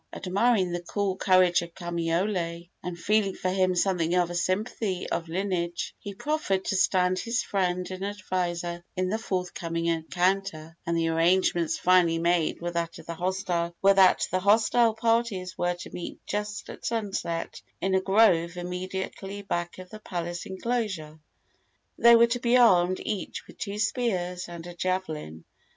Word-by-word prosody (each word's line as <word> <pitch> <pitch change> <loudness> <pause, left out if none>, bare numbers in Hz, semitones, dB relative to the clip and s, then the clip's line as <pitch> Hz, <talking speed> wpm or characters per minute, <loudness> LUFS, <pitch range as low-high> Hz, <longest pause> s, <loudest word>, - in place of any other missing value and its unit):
Admiring 195 0 +1
the 175 0 -2
cool 195 +2 -2
courage 185 -2 +4
of 170 0 -9
Kamaiole, 170 0 -2
and 180 -1 -5
feeling 200 +2 +1
for 185 - -1
him 185 -1 +2
something 180 -2 +1
of 175 -1 +2
a - - -4
sympathy 185 +2 -1
of 165 -1 -3
lineage, 175 -1 -2
he 200 -1 -7
proffered 250 -8 -1
to 200 - 0
stand 185 -1 +2
his 235 +4 -1
friend 180 -2 -1
and 185 +1 -5
adviser 175 -4 -3
in 185 0 0
the 220 +3 -1
forthcoming 180 -5 -3
encounter; 170 0 -1
and 170 0 +1
the 165 0 +1
arrangements 165 0 +2
finally 180 -2 +4
made 170 -1 +1
were 175 - -2
that 170 -1 -2
the 185 +2 +2
hostile 225 +3 +4
parties 225 -5 0
were 175 0 0
to 175 - -10
meet 175 - -7
just 210 0 -4
at - - -12
sunset 195 -7 -3 0.2
in 190 0 0
a 190 - +3
grove 185 -4 +3
immediately 190 +2 -5
back 175 -3 -3
of 185 0 -11
the 215 - -9
palace 175 -4 -5
enclosure. 190 -7 -3 0.8
They 235 0 +8
were 230 0 +7
to 235 +1 -1
be 240 +1 +3
armed 185 -6 +5
each 205 -3 -4
with - - -16
two 205 -1 -4
spears 185 -6 -1
and 170 -1 -8
a 175 - -8
javelin. 160 - -3
185 Hz, 150 wpm, -27 LUFS, 175-200 Hz, 0.8 s, They